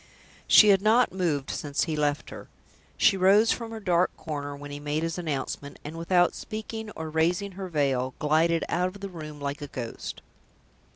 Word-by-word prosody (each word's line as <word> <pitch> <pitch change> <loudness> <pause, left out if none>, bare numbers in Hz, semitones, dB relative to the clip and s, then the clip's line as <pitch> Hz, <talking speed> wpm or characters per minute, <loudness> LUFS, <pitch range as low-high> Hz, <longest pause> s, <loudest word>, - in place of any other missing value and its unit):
She 215 - +8
had 195 -1 +5
not 225 +3 +4
moved 160 -7 -1
since 145 -2 -1
he 160 -3 -2
left 145 -1 -1
her. - - -9 0.5
She 195 - +4
rose 200 +4 +5
from 230 -2 -3
her 225 0 -6
dark 180 -3 +2
corner 145 -2 -5
when 145 0 -9
he 145 - -6
made 150 +2 -2
his 165 +1 -2
announcement, 145 -3 -4
and, 150 +2 -7
without 175 +2 +2
speaking 220 0 -6
or 160 -1 -5
raising 175 +5 +1
her 190 0 -6
veil, 135 -5 0
glided 160 +2 +2
out 180 +1 +1
of 195 +2 -9
the 200 - -5
room 155 -4 -8
like 140 +1 -4
a 145 - -5
ghost. 125 -5 -6
165 Hz, 185 wpm, -27 LUFS, 145-190 Hz, 0.5 s, She